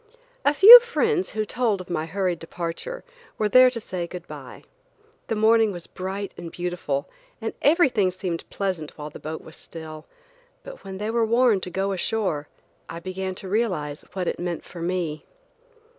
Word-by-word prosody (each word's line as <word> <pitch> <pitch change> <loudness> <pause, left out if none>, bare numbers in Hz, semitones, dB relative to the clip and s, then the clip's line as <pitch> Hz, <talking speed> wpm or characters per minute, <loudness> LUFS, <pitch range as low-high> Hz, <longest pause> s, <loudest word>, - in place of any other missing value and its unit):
A - - +4
few 430 +10 +12
friends 455 -4 0
who 215 0 -2
told 220 -2 0
of 185 - -9
my 160 -2 -3
hurried 180 -1 -1
departure, 170 - -6 0.3
were 215 - +1
there 255 +4 +7
to 245 -2 -4
say 185 -5 -5
good 175 0 -8
bye. - - -10 0.6
The 225 - -1
morning 220 0 +4
was 175 -3 -8
bright 195 +2 -5
and 170 -1 -7
beautiful, 175 -6 -3 0.3
and - - -4
everything 275 - +4
seemed 180 -2 -4
very - - -26
pleasant 185 -6 -4
while 150 0 -7
the - - -10
boat 155 +1 -6
was 160 - -13
still; 155 -1 -10 0.6
but - - -11
when 190 -1 -7
they 210 +3 -3
were 235 0 +1
warned 230 -2 +3
to - - -6
go 195 +2 -1
ashore, 185 -6 -2 0.4
I 165 - -6
began 185 +1 -5
to 190 - -8
realize 185 -9 -1
what 185 -2 -3
it - - -2
meant 175 -1 -4
for 170 - -10
me. 170 -3 -2
185 Hz, 180 wpm, -24 LUFS, 170-225 Hz, 0.6 s, few